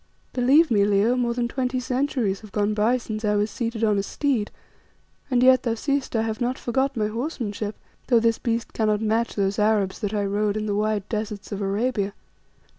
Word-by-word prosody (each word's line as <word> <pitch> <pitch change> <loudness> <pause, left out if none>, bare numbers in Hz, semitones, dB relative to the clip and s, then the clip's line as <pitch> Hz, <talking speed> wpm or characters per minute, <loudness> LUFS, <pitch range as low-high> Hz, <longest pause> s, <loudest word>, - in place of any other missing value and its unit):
"Believe 270 +5 +4
me, 205 -3 +4
Leo, 205 +4 +3
more 240 -2 0
than 240 -1 0
twenty 255 +1 -1
centuries 250 -6 -1
have 215 -2 -13
gone 210 +1 0
by 220 +4 +2
since 220 -2 -6
I 210 -1 +2
was 205 +1 0
seated 230 -2 -3
on 210 -2 +3
a - - +2
steed, 235 0 -1 0.8
and 250 -2 +2
yet 255 0 +6
thou 230 -2 -1
seest 275 +2 -2
I 225 - +2
have 225 +2 -3
not 245 +2 0
forgot 265 +2 -1
my 215 - +1
horsemanship, 215 -3 -3 0.3
though 240 -2 +5
this 230 0 +1
beast 230 -1 -2
cannot 215 -1 +1
match 225 +2 0
those 200 0 0
Arabs 210 -2 +1
that 210 -1 -2
I 205 -1 0
rode 205 +1 0
in 215 - -2
the 205 - -1
wide 210 -1 0
deserts 210 -2 -4
of 200 0 -3
Arabia. 200 0 -1
220 Hz, 200 wpm, -24 LUFS, 210-245 Hz, 0.8 s, yet